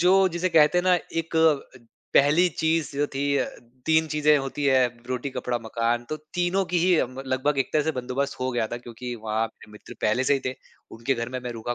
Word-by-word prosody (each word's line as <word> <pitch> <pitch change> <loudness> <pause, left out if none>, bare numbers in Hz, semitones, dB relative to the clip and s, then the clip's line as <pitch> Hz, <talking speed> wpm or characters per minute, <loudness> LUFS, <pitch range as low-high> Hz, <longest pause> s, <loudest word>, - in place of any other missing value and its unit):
जो 180 +2 +5 0.2
जिसे 175 +1 -1
कहते 160 +1 +5
हैं - - +1
ना 185 -1 +5 0.3
एक 165 - -12 0.8
पहली 155 +6 +5
चीज़ 160 -3 0
जो 145 +1 +1
थी 140 +1 +1
अ, - - +1 0.4
3 160 0 +3
चीज़ें 150 0 +3
होती 135 +1 -4
हैं 130 -2 +4 0.2
रोटी 130 +2 -3
कपड़ा 125 -1 -2
मकान 115 +1 -1
तो 155 - -3 0.2
तीनों 180 +2 +1
की 180 0 0
ही 180 +1 +4
अम, 130 +2 -2
लगभग 130 +2 0
एक 135 - -1
तरह 155 - +3
से 160 +1 -1
बंदोबस्त 130 +2 -3
हो 130 0 0
गया 120 -2 0
था 120 - -5
क्योंकि 120 +1 -7
वहाँ 110 +1 0
अपने 110 -1 -11
मित्र 105 - -12
पहले 110 +5 +1
से 140 - +3
ही 135 - -1
थे 130 - -2 0.4
उनके 115 +4 -1
घर 115 -1 -3
में 130 +1 -4
मैं 125 0 -5
रुका 115 +1 -4
135 Hz, 225 wpm, -25 LUFS, 120-160 Hz, 0.8 s, जो